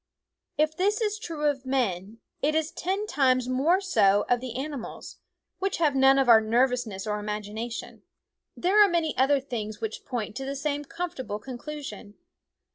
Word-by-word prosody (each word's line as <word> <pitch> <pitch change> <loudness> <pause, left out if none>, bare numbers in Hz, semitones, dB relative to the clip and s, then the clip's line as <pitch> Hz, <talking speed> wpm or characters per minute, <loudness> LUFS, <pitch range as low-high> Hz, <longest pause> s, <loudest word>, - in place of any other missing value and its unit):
If 310 +1 +2
this 405 +4 +1
is 425 -2 -1
true 325 -8 -4
of 280 -3 0
men, 225 -5 -2 0.2
it 305 +2 +1
is 315 0 0
ten 385 +4 -2
times 255 - +2
more 280 +9 +2
so 205 - +3
of 245 - +2
the 250 -1 -6
animals, 275 -1 -6 0.4
which 390 0 -1
have 310 -4 +2
none 270 0 +6
of 270 -2 +3
our 225 -2 +8
nervousness 230 -3 0
or 210 -1 -2
imagination. 210 +2 -5 0.6
There 400 +4 +5
are 405 - +4
many 335 -3 0
other 275 +2 +3
things 220 -6 -5
which 220 -1 -5
point 225 -4 -4
to 270 - -4
the 275 +1 -4
same 290 +1 -2
comfortable 280 -10 -4
conclusion. 260 -2 -8
270 Hz, 165 wpm, -27 LUFS, 225-310 Hz, 0.6 s, our